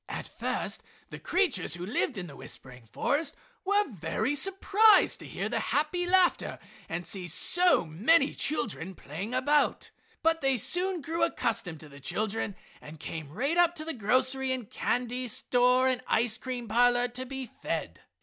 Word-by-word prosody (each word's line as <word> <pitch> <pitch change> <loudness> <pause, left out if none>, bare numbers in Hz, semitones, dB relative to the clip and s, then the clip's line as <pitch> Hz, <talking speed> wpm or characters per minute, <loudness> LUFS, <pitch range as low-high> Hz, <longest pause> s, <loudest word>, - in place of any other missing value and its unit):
At - - -5
first - - -3 0.3
the - - -7
creatures 335 - +1
who 175 +1 -6
lived 230 +4 -1
in 185 - -4
the 145 -5 -11
whispering 125 -3 -9
forest 285 - -1 0.3
were 410 +2 +2 0.5
surprised 390 +6 +4
to - - -10
hear - - -3
the - - -1
happy 330 +4 0
laughter 370 0 +3 0.3
and 170 +2 -4
to - - -1
see 185 -3 -3
so 355 - +4
many 245 - +3
children 215 - -2
playing 195 - -6
about, 290 +3 +1 0.3
but 325 0 +2
they 270 -2 +2
soon 360 - 0
grew 330 +3 -1
accustomed 160 -4 -1
to 155 - -11
the 140 0 -13
children 215 +7 -2 0.3
and 155 +1 -11
came 155 -2 -6
right 275 - -1
up 345 0 +4
to 310 -2 -7
the 325 - -3
grocery 255 +4 +1
and 250 -5 -4
candy 250 +1 -2
store 250 +2 +2
and 255 -1 0
ice 225 -1 +1
cream 250 -2 -5
parlor 245 +2 +3
to 250 +2 -6
be 265 0 -6
fed. 230 - -5
250 Hz, 165 wpm, -29 LUFS, 200-315 Hz, 0.5 s, surprised